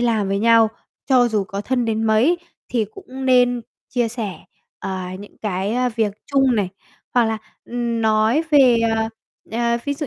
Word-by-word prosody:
làm 225 Hz, -5 st, +1 dB
với 195 Hz, 0 st, 0 dB
nhau, 225 Hz, 0 st, +5 dB, 0.4 s
cho 250 Hz, -3 st, +4 dB
dù 210 Hz, -3 st, 0 dB
có 200 Hz, 0 st, -5 dB
thân 245 Hz, +2 st, 0 dB
đến 225 Hz, 0 st, -1 dB
mấy 235 Hz, +11 st, +3 dB, 0.3 s
thì 230 Hz, -3 st, 0 dB
cũng 265 Hz, -, -9 dB
nên 245 Hz, -1 st, +4 dB, 0.3 s
chia 240 Hz, -2 st, 0 dB
sẻ, 215 Hz, -8 st, -5 dB, 0.3 s
ờ, 190 Hz, -1 st, -4 dB, 0.2 s
những 205 Hz, +1 st, -13 dB
cái, 200 Hz, +1 st, -2 dB
ơ, 250 Hz, 0 st, +1 dB
việc 215 Hz, -3 st, +1 dB
chung 270 Hz, -3 st, +3 dB
này, 200 Hz, -3 st, +1 dB, 0.5 s
hoặc 245 Hz, -2 st, +5 dB
là, 220 Hz, 0 st, -1 dB, 0.3 s
ừm, 235 Hz, -1 st, -2 dB
nói 220 Hz, +7 st, +3 dB
về, 265 Hz, -5 st, +6 dB, 0.2 s
à, 220 Hz, 0 st, 0 dB, 0.4 s
ờ, 235 Hz, 0 st, +1 dB
ví 285 Hz, 0 st, -1 dB
dụ 295 Hz, 0 st, -4 dB
230 Hz, 180 wpm, -21 LUFS, 215-250 Hz, 0.5 s, về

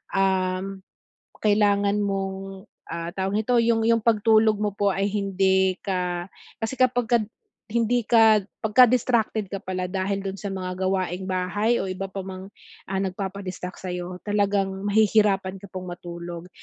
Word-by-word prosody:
um, 190 Hz, 0 st, 0 dB, 0.6 s
kailangan 205 Hz, -1 st, +3 dB
mong, 195 Hz, 0 st, -4 dB, 0.2 s
ah, 170 Hz, +1 st, -4 dB
tawag 195 Hz, +2 st, 0 dB
nito, 245 Hz, +3 st, +1 dB
yung 230 Hz, -1 st, +3 dB
yung 230 Hz, -1 st, +3 dB
pagtulog 220 Hz, -1 st, +4 dB
mo 210 Hz, -1 st, 0 dB
po 200 Hz, -1 st, +2 dB
ay 195 Hz, +1 st, 0 dB
hindi 190 Hz, -2 st, +2 dB
ka 180 Hz, -2 st, -2 dB, 0.3 s
kasi 225 Hz, +4 st, -2 dB
kapag 245 Hz, -2 st, +2 dB
ka 240 Hz, -1 st, +4 dB, 0.5 s
hindi 235 Hz, +2 st, +1 dB
ka 220 Hz, -3 st, +5 dB, 0.2 s
pagka 235 Hz, +4 st, +6 dB
distracted 230 Hz, -3 st, +1 dB
ka 195 Hz, -, -3 dB
pala 185 Hz, -1 st, -3 dB
dahil 195 Hz, +1 st, -2 dB
dun 195 Hz, 0 st, -4 dB
sa 205 Hz, -, -4 dB
mga 185 Hz, -1 st, -4 dB, 0.2 s
gawaing 185 Hz, 0 st, -2 dB
bahay 190 Hz, +5 st, +1 dB
o -, -, -1 dB
iba 185 Hz, +1 st, -4 dB
pa 190 Hz, 0 st, -6 dB
mang, 190 Hz, 0 st, -8 dB, 0.4 s
ah, 195 Hz, -, -2 dB
nagpapa-distract 190 Hz, -1 st, -4 dB
sa'yo, 180 Hz, -1 st, -5 dB
talagang 205 Hz, -1 st, +1 dB, 0.2 s
mahihirapan 200 Hz, -2 st, +2 dB
ka 200 Hz, -, -11 dB
pong 185 Hz, -1 st, -6 dB
matulog. 175 Hz, 0 st, -8 dB
195 Hz, 150 wpm, -24 LUFS, 185-215 Hz, 0.6 s, pagka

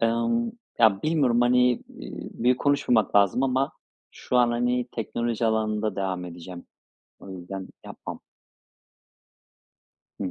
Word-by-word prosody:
Emm, 115 Hz, -, +1 dB, 0.3 s
ya 110 Hz, -2 st, +7 dB
bilmiyorum, 140 Hz, -7 st, +2 dB
hani, 125 Hz, +1 st, +4 dB
eee, -, -, -6 dB, 0.5 s
büyük 125 Hz, +2 st, +2 dB
konuşmamak 140 Hz, -8 st, +2 dB
lazım 100 Hz, +5 st, +4 dB
ama 135 Hz, +1 st, +1 dB, 0.4 s
şu 125 Hz, -, -3 dB
an, 120 Hz, -1 st, +5 dB
hani, 120 Hz, +1 st, 0 dB
teknoloji 115 Hz, 0 st, -2 dB
alanında 110 Hz, -1 st, 0 dB
devam 95 Hz, -2 st, -2 dB
edeceğim. 90 Hz, 0 st, -9 dB, 0.5 s
O 100 Hz, -, -12 dB
yüzden, 95 Hz, +1 st, -7 dB, 0.2 s
yapmam. -, -, -8 dB, 2.0 s
Hı -, -, -2 dB
hı. 95 Hz, -, -2 dB
115 Hz, 120 wpm, -25 LUFS, 100-125 Hz, 2.0 s, ya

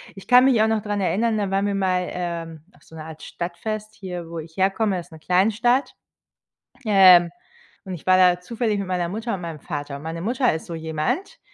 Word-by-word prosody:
Ich 195 Hz, -, -12 dB
kann 250 Hz, +1 st, +7 dB
mich 245 Hz, -5 st, +4 dB
auch 220 Hz, -, +4 dB
noch 220 Hz, -2 st, 0 dB
dran 205 Hz, -1 st, -2 dB
erinnern, 220 Hz, +4 st, +1 dB
da 200 Hz, -2 st, -1 dB
waren 195 Hz, +1 st, 0 dB
wir 200 Hz, -, 0 dB
mal, 185 Hz, -2 st, 0 dB
ähm, 170 Hz, -3 st, -5 dB
auf -, -, -24 dB
so 160 Hz, -, -16 dB
'ne 155 Hz, -, -8 dB
Art 160 Hz, -1 st, -10 dB
Stadtfest 215 Hz, +5 st, -5 dB
hier, 180 Hz, -4 st, -7 dB
wo 170 Hz, -1 st, -6 dB
ich 160 Hz, +2 st, -11 dB
herkomme, 195 Hz, 0 st, +1 dB
ist 170 Hz, 0 st, -11 dB
'ne 160 Hz, -, -12 dB
Kleinstadt, 225 Hz, -, +1 dB, 0.9 s
ähm, 185 Hz, -4 st, +7 dB, 0.6 s
und 190 Hz, -, -6 dB
ich 155 Hz, -, -13 dB
war 185 Hz, 0 st, +5 dB
da 180 Hz, -1 st, +5 dB
zufällig 220 Hz, +1 st, -2 dB
mit 195 Hz, -, -4 dB
meiner 180 Hz, -2 st, -1 dB
Mutter 225 Hz, +3 st, -4 dB
und 185 Hz, -, -4 dB
meinem 165 Hz, -3 st, -6 dB
Vater. 145 Hz, -3 st, -5 dB
Und 145 Hz, -, -12 dB
meine 165 Hz, +1 st, -5 dB
Mutter 245 Hz, -, +1 dB
ist 160 Hz, -, -6 dB
so 170 Hz, -, -5 dB
jemand, 160 Hz, -, -3 dB
185 Hz, 220 wpm, -23 LUFS, 170-215 Hz, 0.9 s, kann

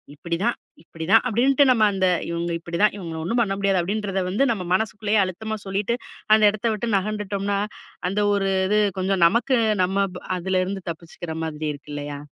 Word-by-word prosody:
"இப்படிதான், 170 Hz, +9 st, -1 dB, 0.3 s
இப்படிதான்" 170 Hz, +7 st, +2 dB
அப்படின்ட்டு 255 Hz, +5 st, +3 dB
நம்ம 230 Hz, -3 st, +3 dB
அந்த 190 Hz, -1 st, +2 dB, 0.2 s
இவங்க 170 Hz, 0 st, -2 dB
இப்படி 170 Hz, 0 st, -5 dB
தான், 210 Hz, -, +5 dB
இவங்கள 165 Hz, -4 st, -6 dB
ஒன்னும் 230 Hz, +8 st, +1 dB
பண்ண 200 Hz, -4 st, 0 dB
முடியாது. 195 Hz, -1 st, +2 dB
அப்படின்றத 195 Hz, +1 st, -2 dB
வந்து 205 Hz, +9 st, +1 dB
நம்ம 195 Hz, -5 st, -3 dB
மனசுக்குள்ளயே, 215 Hz, +1 st, +1 dB
அழுத்தமா 220 Hz, +4 st, -4 dB
சொல்லிட்டு, 200 Hz, +4 st, 0 dB, 0.4 s
அந்த 215 Hz, -, +2 dB
இடத்த 215 Hz, +2 st, -7 dB
விட்டு 215 Hz, +2 st, -3 dB
நகண்டுட்டோம்னா 200 Hz, 0 st, -2 dB, 0.5 s
அந்த 195 Hz, +3 st, -1 dB, 0.2 s
ஒரு 195 Hz, -1 st, 0 dB, 0.2 s
இது, 210 Hz, +2 st, +3 dB, 0.2 s
கொஞ்சம் 185 Hz, -1 st, +1 dB
நமக்கு 235 Hz, +7 st, +2 dB, 0.3 s
நம்ம 195 Hz, +2 st, +1 dB, 0.3 s
அதுல 185 Hz, +1 st, 0 dB
இருந்து 195 Hz, +1 st, -4 dB
தப்பிச்சுக்கிற 165 Hz, +1 st, -8 dB
மாதிரி 155 Hz, -1 st, -4 dB
இருக்கு 145 Hz, +1 st, -12 dB
இல்லயா? 145 Hz, 0 st, -5 dB
195 Hz, 165 wpm, -23 LUFS, 175-215 Hz, 0.5 s, தான்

